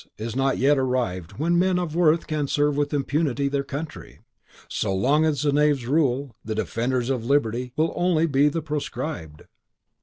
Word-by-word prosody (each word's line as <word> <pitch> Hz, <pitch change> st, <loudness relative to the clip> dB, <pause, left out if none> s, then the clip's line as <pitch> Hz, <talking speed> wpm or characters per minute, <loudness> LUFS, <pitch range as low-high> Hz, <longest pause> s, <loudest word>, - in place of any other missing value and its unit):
is 115 Hz, +1 st, -5 dB
not 135 Hz, 0 st, +1 dB
yet 140 Hz, +2 st, +3 dB
arrived 120 Hz, -10 st, -1 dB
when 170 Hz, +3 st, +1 dB
men 185 Hz, 0 st, +2 dB
of 175 Hz, -3 st, -3 dB
worth 170 Hz, -1 st, +3 dB
can 150 Hz, -2 st, -2 dB
serve 145 Hz, +1 st, +1 dB
with 145 Hz, 0 st, 0 dB
impunity 145 Hz, -1 st, 0 dB
their 140 Hz, 0 st, -1 dB
country. 145 Hz, +3 st, -7 dB, 0.5 s
So 95 Hz, -, -1 dB
long 145 Hz, +10 st, +3 dB
as 150 Hz, -2 st, 0 dB
the 145 Hz, -, +2 dB
knaves 145 Hz, -3 st, +2 dB
rule, 135 Hz, -2 st, 0 dB
the 110 Hz, 0 st, -4 dB
defenders 120 Hz, +3 st, -1 dB
of 125 Hz, -4 st, -2 dB
liberty 125 Hz, -2 st, 0 dB
will 160 Hz, +2 st, +2 dB
be -, -, -9 dB
only 175 Hz, -2 st, +2 dB, 0.2 s
the 160 Hz, +1 st, -3 dB
proscribed." 145 Hz, -, -5 dB
140 Hz, 175 wpm, -24 LUFS, 125-155 Hz, 0.5 s, yet